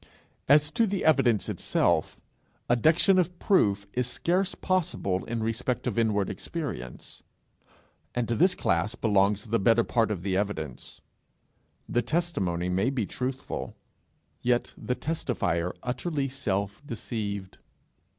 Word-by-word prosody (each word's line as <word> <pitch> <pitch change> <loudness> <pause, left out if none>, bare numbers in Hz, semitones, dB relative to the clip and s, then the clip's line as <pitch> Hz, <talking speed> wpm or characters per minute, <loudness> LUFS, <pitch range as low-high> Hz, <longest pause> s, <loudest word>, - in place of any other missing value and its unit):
As 145 +1 +5
to 230 +4 +2
the 195 -1 -2
evidence 130 -9 +3
itself, - - 0 0.5
adduction 160 - +4
of 180 0 0
proof 100 - +2
is 125 -1 0
scarce 180 +9 0
possible 155 - 0
in 115 -1 -3
respect 115 +2 -1
of - - 0
inward 105 -3 +2
experience, 135 - -6 0.9
and 120 -2 0
to 120 - 0
this 180 +5 +4
class 90 +8 0
belongs 105 -2 +2
the 115 +1 0
better 115 +3 +4
part 115 -3 +1
of 95 -5 -3
the 95 -1 0
evidence: 95 -9 -3 0.9
the 120 - +1
testimony 105 - -1
may 95 +6 +1
be 130 -6 -1
truthful, 130 +5 -4 0.7
yet 120 0 +1
the 125 - -3
testifier 95 - -1
utterly 135 +3 -2
self 100 -6 -2
deceived! 105 -6 -5
120 Hz, 125 wpm, -27 LUFS, 100-145 Hz, 0.9 s, As